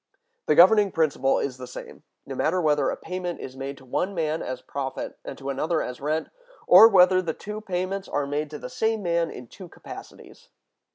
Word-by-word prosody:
The - - +3
governing 200 +3 +6
principle 150 -5 +1
is 130 -2 -3
the 130 -1 -8
same, 125 - -10 0.2
no - - -6
matter 180 +4 0
whether 150 -3 +2
a - - -3
payment 180 -1 -5
is 130 - -8
made 135 +1 -6
to 130 - -16
one 185 +10 -2
man 160 -1 -1
as 130 -1 -5
profit 135 0 -5
and - - -8
to 140 0 -4
another 155 +4 -1
as 125 +1 -7
rent, 155 +3 -1 0.4
or 225 - +9
whether 185 -3 +5
the 165 -3 -3
two 210 +1 -7
payments 190 0 -3
are 145 -1 -1
made 145 +2 -3
to 150 - -7
the - - -7
same 225 -4 -1
man 170 -1 0
in 125 - -9
two 180 - -12
capacities. - - -12
160 Hz, 205 wpm, -25 LUFS, 140-185 Hz, 0.4 s, or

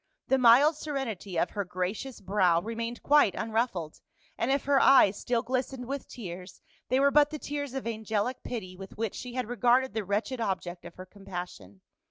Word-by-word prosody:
The 265 - +3
mild 255 +6 +6
serenity 235 - -4
of - - +1
her 205 - -2
gracious 185 +8 -4
brow 185 -3 +2
remained 230 +4 -5
quite 290 -8 +4
unruffled, 220 -8 -2 0.3
and 235 - -1
if 275 0 +1
her 280 -1 +3
eyes 215 -8 +6
still 240 -2 0
glistened 255 0 -3
with 275 +1 -5
tears, 180 -5 -9 0.3
they 260 - +3
were 280 +1 +4
but 295 0 +5
the 310 - -5
tears 285 -2 -5
of 265 - -4
angelic 220 +1 -2
pity 185 -7 -6
with 190 +1 -11
which 220 -2 -2
she 250 -1 -7
had 255 -3 -2
regarded 245 +1 +2
the 220 -1 -2
wretched 210 +6 -2
object 185 -4 -3
of - - -10
her 185 - -9
compassion. 180 - -9
230 Hz, 185 wpm, -28 LUFS, 190-260 Hz, 0.3 s, mild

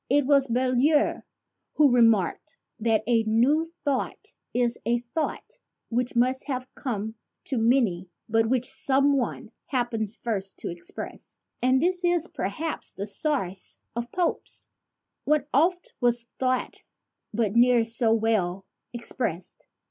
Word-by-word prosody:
It 285 +1 +4
was 280 -1 +4
Boileau 255 +5 +2 0.5
who 285 -5 +5
remarked 230 - +2 0.2
that 220 -1 +2
"a 235 -1 +3
new 235 +8 +3 0.2
thought 275 -3 -2 0.2
is 240 -1 0
a 235 +1 +2
thought 240 +7 -4 0.3
which 245 +2 -1
must 255 +3 +2
have 255 -3 -3
come 220 -5 -3 0.3
to 260 -4 -1
many 225 -7 +2 0.2
but 225 0 +2
which 250 -1 +1
some 275 +1 +2
one 255 -3 -2 0.2
happens 230 -4 -1
first 200 -6 -3
to - - -5
express," 170 0 -7 0.2
and 255 +1 +4
this 360 +4 +1
is 350 -2 +3
per - - -3
haps 320 0 -4
the 200 - -4
source 200 - -1 0.2
of 235 0 -4
Pope's 355 -2 -1 0.3
" - - -58
What 300 -1 +2
oft 345 +6 +2
was 240 -1 +2
thought, 255 -1 -1 0.5
but 220 -2 0
ne'er 240 -1 +5
so 230 0 +3
well 210 -5 +1 0.3
expressed." 215 -7 -4
245 Hz, 135 wpm, -26 LUFS, 225-275 Hz, 0.5 s, who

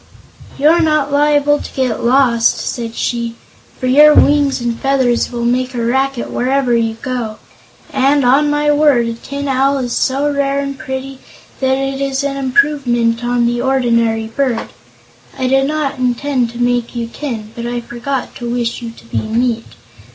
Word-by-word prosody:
"You're 320 +4 +4
not 305 -3 +1
liable 290 0 +3
to - - -9
get 255 -4 -1
lost," 240 -2 +3
said 230 -1 -4
she, 235 -1 -2 0.4
"for - - -3
your 295 +4 +6
wings 285 -2 +4
and 235 -1 -3
feathers 260 -3 +1
will 235 -1 -3
make 255 +1 0
a 235 -1 -1
racket 265 +1 -1
wherever 255 -1 +1
you 225 -1 0
go. 240 -4 -3 0.6
And, 275 0 +2
on 280 +4 +4
my 295 0 +2
word, 290 -5 +3
a 230 - -2
Tin 280 +5 -6
Owl 270 +1 +2
is 245 -3 -3
so 275 +2 0
rare 280 0 0
and 275 0 -3
pretty 265 0 -6 0.4
that 265 0 +1
it 270 0 -3
is 275 0 -1
an 280 -1 -2
improvement 255 -5 +1
on 240 0 +1
the 240 0 0
ordinary 235 -4 +1
bird. 235 +1 -2 0.7
I 260 - -2
did 270 +1 +2
not 300 -3 -2
intend 250 0 0
to 235 - -10
make 245 0 0
you 235 -1 -2
tin, 230 -3 -6
but 235 0 -5
I 240 0 -2
forgot 240 +3 -5
to 240 -1 -5
wish 240 0 -2
you 235 - -5
to 230 - -15
be - - -2
meat. 230 +1 -1
255 Hz, 175 wpm, -16 LUFS, 235-275 Hz, 0.7 s, your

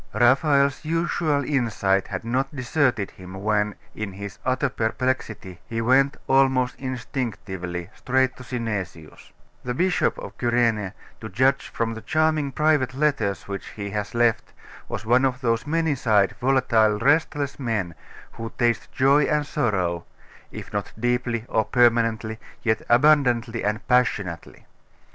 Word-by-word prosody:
Raphael's 140 +3 +3
usual 160 -3 0
insight 110 -8 +1
had 95 -1 -5
not 130 +5 -1
deserted 125 -5 0
him 95 0 -11
when, 105 +1 0 0.2
in 110 -3 -5
his 100 0 -8
utter 130 +2 +1
perplexity, 110 -6 -2
he 115 - -3
went, 130 +4 +3
almost 130 -2 +3
instinctively, 95 -9 -4
straight 130 0 +1
to 130 - -10
Synesius. 105 -10 -5 0.3
The 125 0 -3
Bishop 180 +5 +1
of - - -8
Cyrene, 115 -5 +1 0.3
to 110 - -7
judge 130 +7 +2
from 115 -1 -2
the 110 - -8
charming 155 +2 +1
private 145 -3 +1
letters 135 - 0
which 100 -1 -5
he 100 -2 -5
has 105 +2 -4
left, 120 -1 +1 0.4
was - - -5
one 125 +3 +4
of 130 -1 0
those 115 +2 0
many 160 0 +1
sided, 105 -7 +2
volatile, 120 -4 +3
restless 145 +3 +1
men, 110 -9 -2 0.4
who 115 0 -7
taste 120 -2 0
joy 140 +2 +4
and 150 -1 +1
sorrow, 95 - -1 0.5
if - - -9
not - - -3
deeply 120 -1 -1
or 110 - +1
permanently, 115 -2 +2 0.2
yet 110 -1 +1
abundantly 120 -3 +3
and 105 +1 -2
passionately. 100 -10 0
120 Hz, 135 wpm, -24 LUFS, 105-135 Hz, 0.5 s, one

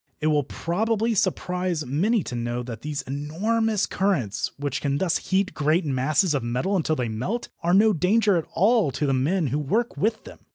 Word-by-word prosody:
It 155 - 0
will 150 - +3
probably 220 - -1
surprise 180 -4 -1
many 190 - +1
to - - -7
know 120 0 -3
that 115 -3 -7
these 150 -1 -4
enormous 195 - 0
currents 175 - -1
which 140 -1 -3
can 140 -1 0
thus 180 +1 +1
heat 195 +1 +1
great 155 +4 +1
masses 145 +5 +1
of 140 - 0
metal 125 +12 -1
until 160 -3 +1
they 125 -5 -2
melt 125 - -3
are 175 +1 +2
no 215 +2 +5
danger 200 +4 +3
at 165 - -1
all 215 -2 +3
to 145 +3 -2
the 135 - +1
men 155 +7 +1
who 145 - +1
work 220 - -1
with 220 +1 0
them. - - -12
165 Hz, 195 wpm, -24 LUFS, 140-200 Hz, -, no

